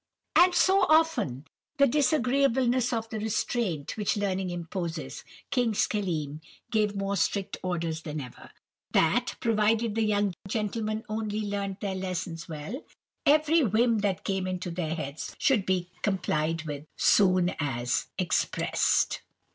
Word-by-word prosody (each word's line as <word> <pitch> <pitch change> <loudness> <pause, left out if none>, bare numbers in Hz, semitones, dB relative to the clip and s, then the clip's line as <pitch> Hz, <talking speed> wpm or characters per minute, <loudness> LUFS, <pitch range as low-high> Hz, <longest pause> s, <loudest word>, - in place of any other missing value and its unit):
"And 360 +1 +7
to - - +1
soften 325 - +3 0.3
the 280 - +6
disagreeableness 260 -3 +2
of 225 -2 -2
the 220 - -4
restraint 215 - -1
which 210 0 0
learning 190 -2 -1
imposes, 175 0 -5 0.3
King 245 -4 +2
Schelim 160 -9 -1 0.3
gave 210 -2 +1
more 195 0 -1
strict 195 0 -1
orders 165 -3 -2
than 155 -1 -5
ever, 125 -4 -10 0.4
that, 240 +11 +2
provided 225 0 +2
the 225 - 0
young 205 -2 +1
gentlemen 215 +1 -2
only 215 -1 -2
learnt 200 -2 -3
their 200 -2 -2
lessons 180 -3 -4
well, 160 - -6 0.4
every 310 +2 +5
whim 230 +1 +3
that 200 -3 -1
came 190 -1 -1
into 185 -1 -3
their 165 -2 -2
heads 145 -2 -6
should 255 -10 +2
be 180 -1 0
complied 165 -5 0
with 150 -1 -6
soon 185 -3 +4
as 125 -4 -1
expressed. 185 -3 +1
200 Hz, 130 wpm, -28 LUFS, 170-230 Hz, 0.4 s, And